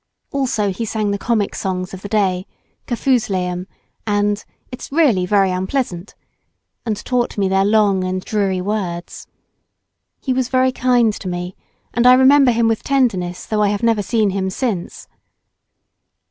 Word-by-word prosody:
Also 245 Hz, -8 st, 0 dB
he 195 Hz, +5 st, -4 dB
sang 215 Hz, -2 st, -1 dB
the 200 Hz, -, -1 dB
comic 220 Hz, -3 st, 0 dB
songs 185 Hz, -1 st, -3 dB
of 190 Hz, -, -8 dB
the 205 Hz, -, -7 dB
day, 190 Hz, -3 st, 0 dB, 0.4 s
"Kafoozleum" 190 Hz, -8 st, 0 dB, 0.4 s
and 205 Hz, 0 st, 0 dB, 0.3 s
"It's 250 Hz, -, -8 dB
really 260 Hz, -, +3 dB
very 195 Hz, -1 st, +3 dB
unpleasant," 185 Hz, 0 st, -3 dB, 0.7 s
and 215 Hz, -2 st, -1 dB
taught 245 Hz, -3 st, -1 dB
me 200 Hz, -1 st, +1 dB
their 190 Hz, 0 st, +2 dB
long 205 Hz, -2 st, +3 dB
and 185 Hz, 0 st, -3 dB
dreary 195 Hz, -3 st, 0 dB
words. 180 Hz, -4 st, -4 dB, 0.9 s
He 260 Hz, -, -1 dB
was 255 Hz, -1 st, -1 dB
very 260 Hz, 0 st, +2 dB
kind 245 Hz, -3 st, +2 dB
to 195 Hz, -, -7 dB
me, 180 Hz, +1 st, -4 dB, 0.4 s
and 240 Hz, +2 st, +3 dB
I 250 Hz, -, +9 dB
remember 265 Hz, +1 st, +6 dB
him 230 Hz, -1 st, +2 dB
with 225 Hz, -1 st, 0 dB
tenderness 205 Hz, -11 st, 0 dB
though 215 Hz, -1 st, -1 dB
I 210 Hz, -, +3 dB
have 205 Hz, +2 st, -2 dB
never 225 Hz, -2 st, +2 dB
seen 215 Hz, -1 st, +1 dB
him 190 Hz, 0 st, -1 dB
since. 195 Hz, -3 st, -4 dB
205 Hz, 155 wpm, -19 LUFS, 190-240 Hz, 0.9 s, I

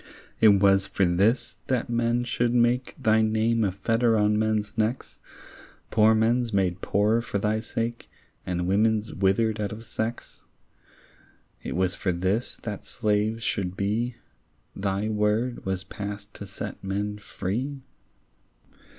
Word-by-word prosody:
It 110 Hz, -, +6 dB
was 100 Hz, -1 st, +5 dB
for 95 Hz, -, +1 dB
this, 100 Hz, +8 st, +1 dB
that 130 Hz, -3 st, 0 dB
men 120 Hz, 0 st, +1 dB
should 120 Hz, 0 st, 0 dB
make 120 Hz, +1 st, +2 dB
Thy 110 Hz, -4 st, +3 dB
name 110 Hz, +1 st, +2 dB
a 100 Hz, -, +1 dB
fetter 115 Hz, +4 st, +1 dB
on 105 Hz, 0 st, +3 dB
men's 110 Hz, -1 st, 0 dB
necks, 115 Hz, +3 st, -2 dB, 0.7 s
Poor 110 Hz, 0 st, +5 dB
men's 115 Hz, +2 st, +2 dB
made 95 Hz, -3 st, 0 dB
poorer 105 Hz, +4 st, +2 dB
for 110 Hz, -, -3 dB
thy 105 Hz, +2 st, 0 dB
sake, 115 Hz, +1 st, -4 dB, 0.3 s
And 90 Hz, -1 st, -2 dB
women's 110 Hz, +3 st, +1 dB
withered 105 Hz, +3 st, +1 dB
out 100 Hz, -, -2 dB
of 110 Hz, +2 st, -8 dB
sex? 115 Hz, +1 st, -4 dB, 1.2 s
It -, -, -5 dB
was 95 Hz, 0 st, +1 dB
for 95 Hz, -, -1 dB
this, 95 Hz, +7 st, -1 dB
that 105 Hz, -4 st, -5 dB
slaves 110 Hz, +1 st, -1 dB
should 95 Hz, -4 st, -2 dB
be, 115 Hz, +5 st, -1 dB, 0.6 s
Thy 100 Hz, +1 st, -1 dB
word 110 Hz, +2 st, 0 dB
was 95 Hz, -1 st, -1 dB
passed 100 Hz, +1 st, -7 dB
to -, -, -9 dB
set -, -, -7 dB
men 100 Hz, +2 st, -2 dB
free? 125 Hz, +8 st, -4 dB
110 Hz, 140 wpm, -26 LUFS, 100-115 Hz, 1.2 s, It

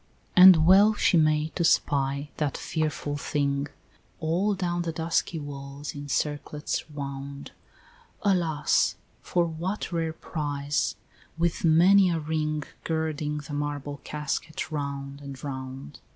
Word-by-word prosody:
XII. -, -, -37 dB
And 180 Hz, -4 st, +9 dB
well 200 Hz, +4 st, +6 dB
she 195 Hz, -, +3 dB
may, 155 Hz, -1 st, +3 dB
to 170 Hz, -, -2 dB
spy 140 Hz, -2 st, +1 dB
that 150 Hz, -3 st, -1 dB
fearful 150 Hz, -2 st, -2 dB
thing 140 Hz, -1 st, -1 dB, 0.5 s
All 180 Hz, +6 st, +1 dB
down 175 Hz, -2 st, -1 dB
the 170 Hz, -1 st, -2 dB
dusky 165 Hz, +1 st, -1 dB
walls 140 Hz, -1 st, -7 dB
in 145 Hz, 0 st, -7 dB
circlets 150 Hz, +2 st, -2 dB
wound; 140 Hz, -1 st, -6 dB, 0.7 s
Alas! 175 Hz, -7 st, +2 dB, 0.3 s
for 175 Hz, -1 st, +1 dB
what 170 Hz, +6 st, -4 dB
rare 165 Hz, -2 st, -1 dB
prize, 145 Hz, -3 st, -2 dB, 0.4 s
with 170 Hz, 0 st, 0 dB
many 180 Hz, +4 st, +6 dB
a 170 Hz, -, 0 dB
ring 155 Hz, -1 st, -1 dB, 0.2 s
Girding 155 Hz, -2 st, -2 dB
the 145 Hz, -, -7 dB
marble 145 Hz, -1 st, -4 dB
casket 150 Hz, +2 st, -4 dB
round 140 Hz, -1 st, -4 dB
and 140 Hz, -2 st, -9 dB
round? 130 Hz, -, -7 dB
150 Hz, 125 wpm, -27 LUFS, 145-165 Hz, 0.7 s, And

